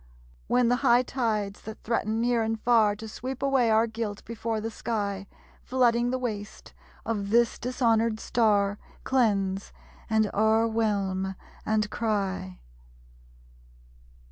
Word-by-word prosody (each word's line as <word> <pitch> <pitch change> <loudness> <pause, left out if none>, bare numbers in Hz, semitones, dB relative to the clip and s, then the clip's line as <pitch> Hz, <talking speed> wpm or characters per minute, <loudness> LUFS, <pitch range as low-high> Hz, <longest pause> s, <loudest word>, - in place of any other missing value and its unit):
When 245 -1 +3
the 245 +1 +3
high 245 -2 +4
tides 215 -6 -2
that 220 0 -9
threaten 220 -1 -1
near 240 0 +2
and 225 0 -1
far 220 -3 +3
To 220 +1 -8
sweep 255 +5 -6
away 270 -4 +3
our 220 +1 +4
guilt 220 -2 -5
before 225 0 -3
the 225 +1 -4
sky, 200 -4 -3 0.3
Flooding 240 -1 +2
the 255 - 0
waste 215 -5 -6 0.3
of 205 -3 -2
this 235 +1 +3
dishonored 230 -3 +1
Star, 205 -4 +1 0.2
Cleanse, 200 -6 +1 0.4
and 220 0 +3
o'erwhelm, 210 -3 +1 0.3
and 215 -1 +1
cry! 195 - -2
220 Hz, 120 wpm, -27 LUFS, 205-235 Hz, 0.4 s, high